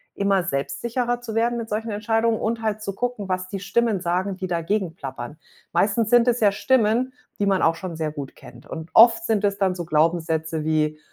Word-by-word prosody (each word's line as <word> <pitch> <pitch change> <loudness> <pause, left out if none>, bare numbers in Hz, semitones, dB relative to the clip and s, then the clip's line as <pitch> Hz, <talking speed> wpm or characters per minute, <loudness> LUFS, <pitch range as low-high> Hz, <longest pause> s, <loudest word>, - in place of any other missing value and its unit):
immer 200 -2 +2
selbstsicherer 235 - -2
zu 225 -2 -6
werden 235 +1 +1
mit 230 -1 -5
solchen 220 +2 -2
Entscheidungen 225 +2 +1
und 225 +1 -2
halt 215 -1 -2
zu 200 -2 -4
gucken, 245 -3 -3
was 185 0 -2
die 195 - -4
Stimmen 210 +2 +1
sagen, 185 +2 -1
die 190 0 -4
dagegen 175 +1 -1
plappern. 135 -1 -7 0.4
Meistens 215 +2 +2
sind 240 0 +5
es 245 0 +1
ja 210 -2 +4
Stimmen, 250 +2 +2 0.3
die 205 - +1
man 195 -1 +2
auch 165 - +3
schon 170 0 -6
sehr 155 -1 -2
gut 140 -3 -7
kennt. 125 - -14
Und 160 +1 -7
oft 230 0 +7
sind 215 -2 +1
es 200 -1 +1
dann 190 -2 +1
so 175 - -4
Glaubenssätze 160 0 0
wie: 155 -1 0
200 Hz, 205 wpm, -23 LUFS, 165-225 Hz, 0.4 s, oft